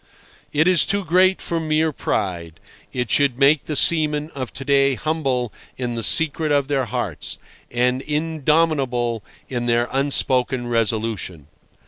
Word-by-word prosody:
It 155 +3 +2
is 185 -3 +4
too 200 -1 -1
great 185 +3 +3
for 170 - -2
mere 155 0 +1
pride. 85 - -3 0.3
It 125 -3 -3
should 140 -4 +2
make 140 +1 +4
the 150 - -3
seamen 150 0 +2
of 130 -3 -6
to 135 +1 -7
day 140 -1 +3
humble 135 -7 -1 0.2
in 125 -2 -3
the 115 - -3
secret 155 +4 +1
of 140 -2 +2
their 135 -3 0
hearts, 115 - -4 0.3
and 125 +2 +1
indomitable 150 -6 0 0.2
in 120 -2 -3
their 120 0 +2
unspoken 130 -2 +1
resolution. 110 - -2
135 Hz, 140 wpm, -21 LUFS, 120-155 Hz, 0.3 s, is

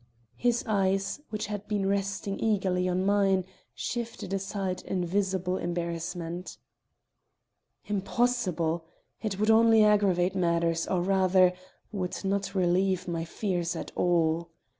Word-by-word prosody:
His 240 0 +1
eyes, 195 +2 0
which 215 -1 -3
had 205 -1 -5
been 205 -2 0
resting 195 0 -1
eagerly 185 -4 +1
on 185 +1 0
mine, 195 -2 +3 0.3
shifted 235 -5 -4
aside 195 -1 -2
in 180 -2 -2
visible 190 0 0
embarrassment. 170 0 -4 1.3
"Impossible! 190 -6 0 0.4
It 205 -3 -3
would 215 +1 +4
only 225 0 +6
aggravate 195 -4 +3
matters, 170 -2 +1
or 180 -2 0
rather, 185 -1 +4 0.4
would 190 -2 -4
not 200 +1 -1
relieve 185 0 +1
my 165 -1 -2
fears 175 -2 -2
at - - -6
all. 170 -1 +1
190 Hz, 120 wpm, -28 LUFS, 175-205 Hz, 1.3 s, only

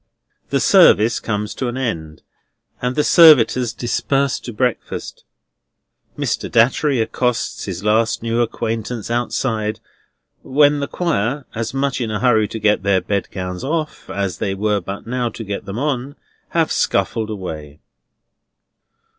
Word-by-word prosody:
The - - +1
service 110 +3 +5
comes 105 -1 -3
to 130 - -3
an 120 +1 -3
end, 80 -12 -4 0.6
and 125 +1 -1
the 150 - +2
servitors 130 -9 +6
disperse 135 +3 0
to 120 - -7
breakfast. 125 +2 -3 0.9
Mr. - - -2
Datchery 130 +4 +3
accosts 125 +1 -1
his 95 -1 -5
last 110 +1 +1
new 115 +1 0
acquaintance 115 0 -3
outside, 115 -2 -1 0.6
when 145 +1 +3
the 140 - -2
Choir 140 - -1
(as 115 +3 -4
much 135 -1 -1
in 115 - -2
a 105 -1 -2
hurry 110 -4 +3
to 110 - -6
get 105 -2 +2
their 100 -1 +2
bedgowns 90 -2 -3
off, 155 +2 -3
as 100 -3 -3
they 95 -1 -1
were 105 +1 0
but 95 +3 -7
now 120 0 -1
to 115 - -8
get 100 -1 -5
them 100 +2 -6
on) 140 0 -2 0.3
have - - +1
scuffled 110 -1 0
away. 80 -8 -7
115 Hz, 140 wpm, -19 LUFS, 105-130 Hz, 0.9 s, servitors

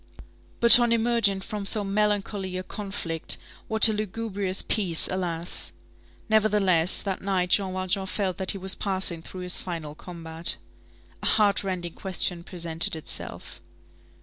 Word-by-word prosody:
But 235 +1 +10
on 240 -1 +1
emerging 230 -4 0
from 210 0 -7
so 205 +1 +1
melancholy 200 -2 -2
a 185 - -5
conflict, 185 -6 -3 0.3
what 220 +1 +9
a 220 - +1
lugubrious 205 -2 -2
peace, 185 -7 +2
alas! 175 -2 -3 0.5
Nevertheless, 205 -6 +2
that 195 -2 -4
night 185 -2 -2
Jean 195 -2 +2
Valjean 185 +1 -3
felt 190 -2 -3
that 190 -1 -5
he - - 0
was 190 0 +1
passing 190 -4 -1
through 185 +3 -10
his 180 0 -2
final 165 -4 -7
combat. 165 0 -3 0.6
A - - -2
heart 205 -2 +1
rending 180 -3 -5
question 180 -2 -1
presented 170 -2 +1
itself. 160 - -5
190 Hz, 140 wpm, -24 LUFS, 180-210 Hz, 0.6 s, But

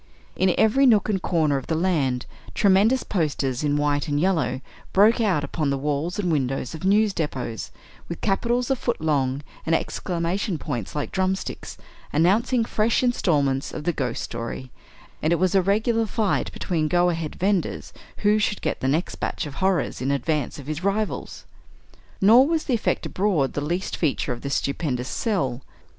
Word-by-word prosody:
In 185 -1 +2
every 265 +5 +4
nook 215 -3 +4
and 195 -3 0
corner 155 -6 +1
of 135 - -6
the 160 - 0
land, 150 -8 0 0.3
tremendous 210 +6 +4
posters, 145 - -1
in 145 -1 +1
white 145 +1 0
and 145 -1 0
yellow, 175 -6 +1 0.3
broke 215 +5 +5
out 185 -10 +2
upon 150 0 -1
the 140 - 0
walls 150 +5 -2
and 185 -4 0
windows 135 -4 -1
of 160 - -8
news 205 +2 +3
depots, 130 - -3 0.4
with 170 - -5
capitals 240 +5 0
a - - +3
foot 240 -1 -2
long, 140 -3 0 0.2
and 165 - +2
exclamation 175 +3 -2
points 125 - -5
like 145 - -3
drumsticks, 190 0 -2 0.3
announcing 220 - +2
fresh 225 +2 +1
installments 145 - +1
of - - -5
the 175 - 0
"Ghost" 125 -6 -2
story, 115 +2 -6 0.5
and 155 - +1
it - - +5
was 185 +2 +1
a 195 - +5
regular 220 +4 +1
fight 210 0 0
between 160 -4 -1
go 175 +2 +3
ahead 165 -2 -4
vendors 195 -1 -1 0.3
who 210 +1 +5
should 210 -1 -1
get - - -1
the 130 - -1
next 155 +6 0
batch - - -2
of 145 - -7
horrors 190 -7 0
in 130 - -1
advance 140 0 -1
of 140 - -9
his 155 +4 -4
rivals. 205 +2 -2 0.7
Nor 235 +7 +7
was 320 -1 0
the 260 - -1
effect 230 - 0
abroad 180 -9 0
the 145 - -2
least 175 +6 -2
feature 140 -5 0
of 120 - -9
this 140 0 -2
stupendous 135 -4 -2
"sell." 140 - -1
170 Hz, 175 wpm, -24 LUFS, 145-200 Hz, 0.7 s, Nor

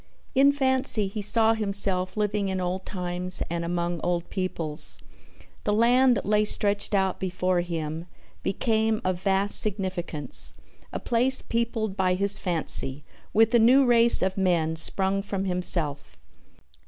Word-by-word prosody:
In 275 +2 +4
fancy 260 -6 0
he 205 +2 -6
saw 220 +2 +4
himself 200 -3 -1
living 210 -1 -1
in 190 0 -3
old 185 +1 -4
times 180 -1 0
and 170 0 -3
among 170 0 -3
old 175 -1 -3
peoples. 165 -5 -2 0.7
The 210 - 0
land 245 +3 +3
that - - -5
lay 210 +1 +2
stretched 205 -1 +2
out 190 -1 0
before 185 -1 -1
him 165 -1 -5 0.3
became 220 +1 -1
of 185 -1 -2
vast 195 +1 +2
significance, 185 - 0 0.4
a - - -5
place 250 +3 +2
peopled 230 -3 -3
by 185 -2 0
his 200 +2 0
fancy 150 -5 -3 0.3
with 225 +2 +3
a 235 - +5
new 255 +5 +5
race 235 -3 +5
of 190 +1 -2
men 170 -4 0
sprung 190 +4 -1
from 195 -1 -4
himself. 175 -5 -1
195 Hz, 140 wpm, -25 LUFS, 180-220 Hz, 0.7 s, a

